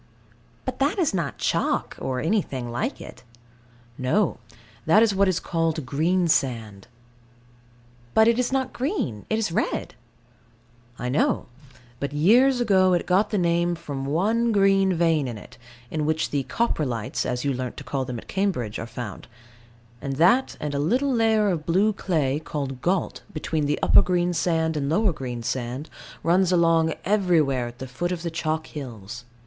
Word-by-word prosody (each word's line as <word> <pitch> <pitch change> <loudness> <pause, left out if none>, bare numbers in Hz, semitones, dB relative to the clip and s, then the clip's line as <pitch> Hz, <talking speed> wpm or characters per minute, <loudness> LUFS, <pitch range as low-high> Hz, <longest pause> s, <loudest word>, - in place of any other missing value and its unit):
But - - -4
that 280 +7 +1
is 330 - +1
not 170 -8 -2
chalk, - - 0
or 130 -1 -2
anything 140 - -1
like 120 - -2
it. 130 - -11 0.8
No, 165 +9 +1 0.5
that 210 +8 +6
is 220 -3 +2
what 195 0 +3
is 185 -2 +1
called 165 -3 -1
Greensand. 135 - 0 1.3
But 220 0 +6
it 235 +1 +3
is 250 0 0
not 265 -1 -1
green, 250 - -3
it 220 - +1
is 220 -6 -1
red. - - -1 1.0
I 125 - -4
know: 130 +5 +1 0.5
but 140 +1 -3
years 245 - +4
ago 190 -5 +4
it 175 - +1
got 195 +3 +2
the 210 - -1
name 170 -1 +1
from 140 -4 -5
one 220 +10 +1
green 195 -2 +4
vein 165 -4 +2
in 120 -3 -5
it, - - -14 0.3
in 155 -1 -1
which 160 0 0
the 140 -2 -1
"Coprolites," 130 - -1
as 125 +2 -2
you 140 - +1
learnt 125 -1 -5
to - - -7
call 135 -2 -2
them 125 -1 -5
at - - -10
Cambridge, 180 - -1
are 115 - -5
found; 115 -4 -7 0.7
and 140 - -3
that, 185 - +3
and 150 -1 -3
a 140 - -1
little 255 - +1
layer 220 -3 +3
of 165 -5 -2
blue 195 +6 +3
clay, 150 -8 0
called 140 -5 -5
gault, 180 0 -1
between 155 -1 -1
the 150 - +1
upper - - +7
Greensand 175 -2 0
and 140 -2 -1
lower 200 +3 +2
Greensand, 125 +2 -4 0.3
runs 180 +2 +3
along 165 -2 +3
everywhere 165 - +2
at 120 0 -10
the 130 - -6
foot 155 +8 -3
of 175 -2 -4
the 170 - -3
chalk 160 -1 -2
hills. 120 -5 -8
165 Hz, 165 wpm, -24 LUFS, 135-195 Hz, 1.3 s, upper